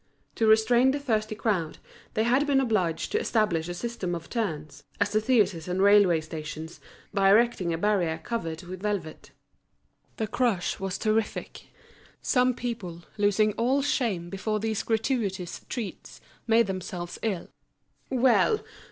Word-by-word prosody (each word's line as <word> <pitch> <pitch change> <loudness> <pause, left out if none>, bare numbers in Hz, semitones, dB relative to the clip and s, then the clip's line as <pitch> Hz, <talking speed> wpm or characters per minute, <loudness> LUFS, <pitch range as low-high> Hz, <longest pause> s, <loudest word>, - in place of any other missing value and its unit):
To 225 - +1
restrain 235 +4 +5
the 280 +2 0
thirsty 215 -5 -1
crowd, 195 -8 -1 0.4
they 220 - +2
had 260 +5 +2
been 275 -2 +4
obliged 200 -10 0
to 430 - +2
establish 210 - +1
a 175 - -4
system 190 -4 -3
of 165 -1 -9
turns, 155 -10 -3 0.2
as - - 0
at 215 - +4
theatres 200 -10 +2
and 180 +1 -2
railway 200 -4 +5
stations, 155 +1 -7 0.3
by 195 -1 +4
erecting 210 -4 +3
a 165 - -1
barrier 175 -4 +1
covered 165 -8 -4
with 185 +1 -8
velvet. 200 -7 -3 0.9
The 220 - -1
crush 230 -4 0
was 195 -1 -3
terrific. 220 0 -2 0.5
Some 250 -2 +2
people, 195 -9 -5 0.2
losing 210 +1 +3
all 260 +6 +1
shame 210 -12 -1
before 215 +2 -2
these 220 0 -1
gratuitous 220 -6 -2
treats, 230 -6 -6 0.3
made 230 +1 +5
themselves 185 -2 -5
ill. 200 -6 -2 0.6
"Well! 260 - +3
210 Hz, 145 wpm, -27 LUFS, 175-235 Hz, 0.9 s, restrain